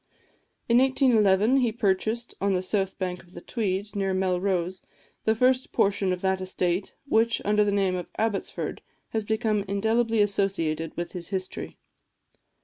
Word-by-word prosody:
In 235 +1 +5
1811 240 -4 +4
he 245 -4 +2
purchased, 220 +2 0
on 200 0 +2
the 185 0 0
south 195 0 -1
bank 180 -2 -3
of 175 +1 -21
the 175 - -9
Tweed, 205 -1 -3
near 195 -1 0
Melrose, 185 -1 0 0.4
the 220 - +3
first 255 +2 +2
portion 195 -1 +1
of 180 0 -2
that 190 0 0
estate 185 0 -1
which, 230 -3 +2
under 210 +1 +3
the 205 - +1
name 195 -2 +1
of 180 -1 -5
Abbotsford, 220 -3 -2 0.3
has 220 -2 -2
become 215 -1 0
indelibly 225 +3 +1
associated 195 -6 0
with 175 0 -3
his 175 -2 -7
history. 190 -2 -4
200 Hz, 150 wpm, -26 LUFS, 185-220 Hz, 0.4 s, In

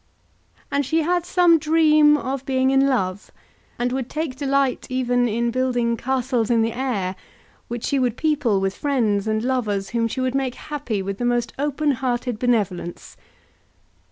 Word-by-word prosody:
And 285 0 +1
she 320 +4 +1
had 350 +1 0
some 345 -3 +4
dream 305 -1 +4
of 270 -1 -4
being 260 -1 +1
in 270 0 +4
love, 200 -7 -1 0.5
and 245 +1 -1
would 260 -1 -3
take 310 -4 -3
delight 275 -1 0
even 245 -1 +1
in 235 +1 0
building 245 -2 0
castles 250 -2 -1
in 230 -2 +3
the 225 0 -1
air, 220 -8 -2 0.5
which 240 0 -5
she 280 - 0
would 245 -2 0
people 290 -10 +1
with 195 0 -1
friends 220 -8 0
and 215 0 0
lovers 215 -6 -1
whom 230 -1 +1
she 230 - -5
would 255 -1 0
make 265 -2 -1
happy 270 -10 -4
with 195 +1 -5
the 245 - -1
most 240 -1 0
open 295 +1 0
hearted 245 -2 -2
benevolence. 200 -8 -1
255 Hz, 165 wpm, -22 LUFS, 230-275 Hz, 0.5 s, some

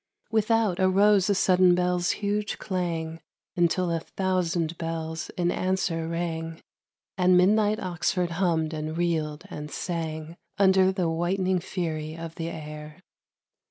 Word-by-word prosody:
Without 220 -3 +2
arose 195 +1 +4
a 200 - +3
sudden 185 -1 +4
bell's 180 0 +1 0.2
huge 210 +1 -1
clang 165 -3 -3 0.3
Until 175 0 +2
a 165 - 0
thousand 175 -2 -1
bells 160 -1 -4
in 175 -1 +1
answer 185 -3 -1
rang 165 -1 -3 0.6
And 180 0 +5
midnight 210 +3 +3
Oxford 180 0 -1
hummed 160 -3 +1
and 155 +1 -4
reeled 160 -3 -1
and 150 0 -6
sang 160 0 -4 0.2
Under 190 -1 +5
the 185 -3 -1
whitening 180 +3 0
fury 160 -3 -4
of 165 -1 -7
the 165 0 -4
air. 150 +1 -9
175 Hz, 125 wpm, -26 LUFS, 160-185 Hz, 0.6 s, And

